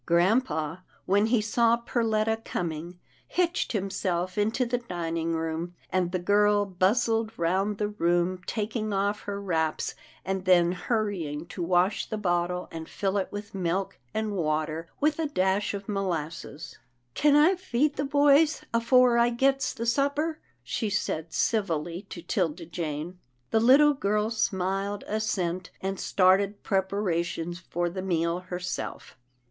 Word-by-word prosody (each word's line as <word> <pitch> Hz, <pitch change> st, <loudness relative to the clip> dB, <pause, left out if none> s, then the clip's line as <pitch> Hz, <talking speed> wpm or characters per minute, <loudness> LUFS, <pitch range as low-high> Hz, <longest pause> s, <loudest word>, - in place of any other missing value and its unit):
Grampa, 175 Hz, -, +1 dB, 0.2 s
when 205 Hz, +3 st, +3 dB
he 230 Hz, -1 st, +3 dB
saw 230 Hz, +2 st, +3 dB
Perletta 225 Hz, -2 st, 0 dB
coming, 170 Hz, +1 st, -4 dB, 0.3 s
hitched 350 Hz, -6 st, 0 dB
himself 185 Hz, -3 st, -1 dB
into 220 Hz, +5 st, +1 dB
the 240 Hz, +1 st, -1 dB
dining 165 Hz, -6 st, -2 dB
room, 165 Hz, +2 st, -3 dB, 0.2 s
and 180 Hz, -2 st, +1 dB
the 185 Hz, -, 0 dB
girl 205 Hz, +3 st, +3 dB
bustled 220 Hz, +4 st, +1 dB
round 190 Hz, +5 st, 0 dB
the 210 Hz, 0 st, -1 dB
room, 175 Hz, -2 st, +1 dB
taking 215 Hz, 0 st, -2 dB
off 200 Hz, +1 st, 0 dB
her 200 Hz, -1 st, -3 dB
wraps, 160 Hz, -5 st, -1 dB, 0.3 s
and 190 Hz, 0 st, -2 dB
then 175 Hz, -2 st, +5 dB
hurrying 180 Hz, -6 st, -2 dB
to 175 Hz, +1 st, -7 dB
wash 180 Hz, +3 st, +2 dB
the 215 Hz, -, -2 dB
bottle, 180 Hz, -2 st, 0 dB
and 160 Hz, -1 st, -7 dB
fill 195 Hz, -1 st, -1 dB
it 190 Hz, -, -3 dB
with 205 Hz, 0 st, -7 dB
milk 190 Hz, 0 st, -2 dB
and 220 Hz, -1 st, -2 dB
water 155 Hz, -2 st, -1 dB
with 300 Hz, +2 st, +1 dB
a 320 Hz, -, +1 dB
dash 190 Hz, -5 st, +1 dB
'of 200 Hz, 0 st, -7 dB
molasses. 170 Hz, -6 st, -4 dB, 0.2 s
" 120 Hz, 0 st, -45 dB
Kin 290 Hz, -, +4 dB
I 305 Hz, +6 st, +6 dB
feed 300 Hz, -6 st, 0 dB
the 285 Hz, -, -1 dB
boys 290 Hz, +2 st, +4 dB
afore 240 Hz, +1 st, +4 dB
I 235 Hz, 0 st, +4 dB
gets 270 Hz, +3 st, +1 dB
the 230 Hz, -, -5 dB
supper? 285 Hz, +6 st, +1 dB
" -, -, -39 dB
she 210 Hz, -, -2 dB
said 165 Hz, -5 st, -2 dB
civilly 175 Hz, -5 st, -1 dB
to 170 Hz, -, -8 dB
'Tilda 170 Hz, -3 st, -1 dB
Jane. 165 Hz, +1 st, -5 dB, 0.3 s
The 225 Hz, -, +4 dB
little 275 Hz, +6 st, +6 dB
girl 210 Hz, -3 st, 0 dB
smiled 200 Hz, -2 st, -1 dB
assent, 185 Hz, -5 st, -2 dB
and 195 Hz, 0 st, -3 dB
started 195 Hz, +2 st, +3 dB
prepara 190 Hz, -3 st, 0 dB
tions 170 Hz, +1 st, -5 dB
for 175 Hz, -1 st, -2 dB
the 185 Hz, +2 st, -4 dB
meal 170 Hz, -2 st, 0 dB
herself. 180 Hz, 0 st, -5 dB
195 Hz, 150 wpm, -27 LUFS, 175-225 Hz, 0.3 s, I